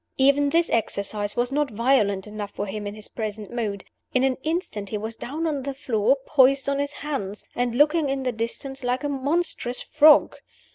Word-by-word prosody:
Even 280 +1 +4
this 335 +3 +3
exercise 205 -2 -1
was 245 +1 0
not 295 0 +1
violent 215 -4 +2
enough 210 -1 -6
for 205 - -4
him 205 +1 -5
in 205 - -6
his 215 0 -10
present 215 -2 -5
mood. 210 -5 -3 0.3
In 255 - +4
an 265 -1 +2
instant 310 - -3
he 215 - -2
was 220 +2 -5
down 300 +8 -4
on 295 -4 -1
the 275 +1 -4
floor, 250 -1 +1
poised 275 -1 +4
on 280 0 0
his 285 0 -1
hands, 210 -9 -4
and 245 -1 0
looking 300 +2 +3
in 270 0 -1
the 255 - 0
distance 250 +4 -5
like 250 +3 -1
a 290 - -1
monstrous 280 -2 -1
frog. 305 0 +5
255 Hz, 195 wpm, -24 LUFS, 215-280 Hz, 0.3 s, frog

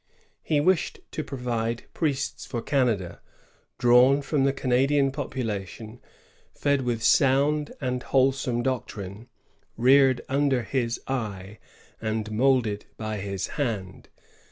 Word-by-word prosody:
He 150 - +1
wished 180 +3 +1
to 155 - -3
provide 120 -4 -3
priests 145 -5 -2
for 120 - -3
Canada, 115 - 0 0.6
drawn 125 +4 +5
from 140 -1 +1
the 135 - +3
Canadian 135 +2 +2
population, 115 -5 -5 0.5
fed 140 -1 +1
with 120 -3 -2
sound 145 +4 +3
and 125 -2 -2
wholesome 130 -2 +1
doctrine, 110 -4 -4 0.5
reared 130 +1 +5
under 135 -2 +1
his 120 -1 -1
eye, 105 -6 -4 0.4
and 110 -1 -2
moulded 115 -3 +1
by 110 -1 -4
his 100 -1 -3 0.2
hand. 105 -8 -4
125 Hz, 110 wpm, -26 LUFS, 110-135 Hz, 0.6 s, drawn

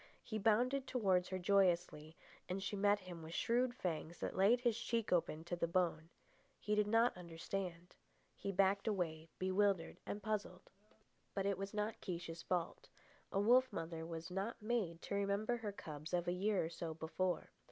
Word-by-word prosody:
He 220 -1 -3
bounded 250 +6 +3
towards 190 -8 +2
her 185 - -2
joyously, 175 -5 +2 0.3
and 190 +1 -2
she 195 +2 -2
met 205 +1 +3
him 180 -2 -8
with 160 +1 -7
shrewd 245 +1 +2
fangs 170 -4 -3
that - - -3
laid 210 +6 +5
his 240 -3 +2
cheek 230 -3 0
open 160 -2 +1
to 175 +1 -3
the 170 -1 0
bone. 170 -2 +1 0.5
He 210 - -1
did 210 0 +3
not 230 +3 +4
understand. 175 0 -5 0.4
He 200 - -3
backed 195 +2 +3
away, 165 -6 -1
bewildered 190 -1 +1
and 205 - -4
puzzled. 205 -4 -3 0.6
But 195 - 0
it 200 -2 +1
was 195 0 -3
not 210 +1 -2
Kiche's 170 -2 -4
fault. 175 -2 -2 0.4
A 195 - +1
wolf 250 +5 +5
mother 165 -3 -4
was 165 +1 -6
not 195 +5 -2
made 210 -7 -1
to - - -4
remember 200 +4 +1
her 220 -3 -4
cubs 155 -3 -5
of 175 0 -1
a 175 - +2
year 195 -1 +1
or - - -3
so 165 -1 -5
before. 175 +3 -1
190 Hz, 175 wpm, -38 LUFS, 170-210 Hz, 0.6 s, laid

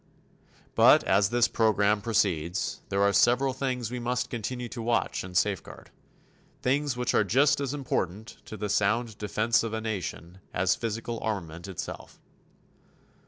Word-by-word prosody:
But - - +6
as 100 +1 +3
this 120 0 +3
program 105 -2 +2
proceeds 95 -5 0
there 100 0 +1
are 100 0 +3
several 130 +4 +3
things 125 -3 -3
we 125 - -3
must 125 +1 -2
continue 120 +1 -4
to 120 - -6
watch 115 +1 0
and 90 -1 -3
safeguard, 100 -4 -2 0.7
things 140 0 +1
which 125 -1 0
are - - +4
just 140 +8 +3
as 140 -2 -2
important 110 -7 -3
to 110 - -8
the 105 - -3
sound 110 +2 0
defense 110 +2 +1
of 115 -1 -4
a 110 - -1
nation 95 -4 -5 0.2
as - - +3
physical 115 +1 -4
armament 85 -6 -4
itself. 95 -4 -7
110 Hz, 150 wpm, -27 LUFS, 100-125 Hz, 0.7 s, But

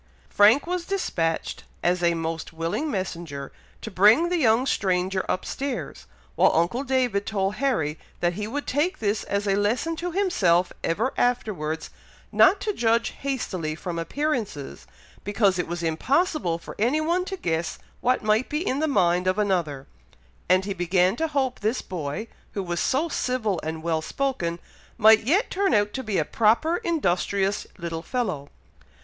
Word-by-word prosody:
Frank 215 +7 +5
was 355 0 -2
despatched, 170 - -2 0.2
as 175 0 +2
a 170 -1 +3
most 165 0 -4
willing 165 - -2
messenger, 170 - -4 0.3
to 220 - -6
bring 215 - +5
the 360 - +1
young 235 -2 +3
stranger 190 -4 0
up - - -1
stairs, 275 -2 -5 0.3
while - - +4
uncle 175 +11 +1
David 250 -7 0
told 195 -1 0
Harry 160 - 0 0.2
that 175 0 +1
he 210 +3 -4
would 285 +6 -4
take 315 +8 0
this 210 0 -1
as 200 +1 -1
a 195 - +3
lesson 220 +11 0
to 350 +2 -3
himself 190 - +2
ever 220 +11 0
afterwards, 185 -11 -1 0.4
not 395 - +5
to 420 - -1
judge 230 - +2
hastily 185 - -3
from 170 0 -5
appearances, 210 - -3 0.4
because 200 -2 +2
it 180 - -1
was 175 0 -4
impossible 225 - +1
for 170 - -10
any 245 +8 +2
one 340 +4 +1
to 385 0 -5
guess 165 - -2 0.2
what 250 0 +1
might 215 +3 +2
be 300 +5 -2
in 270 - 0
the 315 - +1
mind 180 - +2
of 185 +2 +2
another; 170 -10 0 0.6
and 185 +1 +4
he 200 - -2
began 180 +1 +2
to 320 +5 -1
hope 270 -4 -1
this 220 +4 -1
boy, 175 +4 -4 0.3
who 200 - -2
was 175 -1 -3
so 290 +6 +1
civil 245 - -1
and 160 0 -5
well 165 -1 0
spoken, 220 - -2 0.4
might 220 -1 +6
yet 370 - +2
turn 390 - +2
out 205 0 +2
to 265 - -3
be 215 -6 -2
a 155 - +1
proper, 235 - +2
industrious 200 - 0
little 170 -3 -4
fellow. 185 - -3
205 Hz, 165 wpm, -25 LUFS, 175-265 Hz, 0.6 s, might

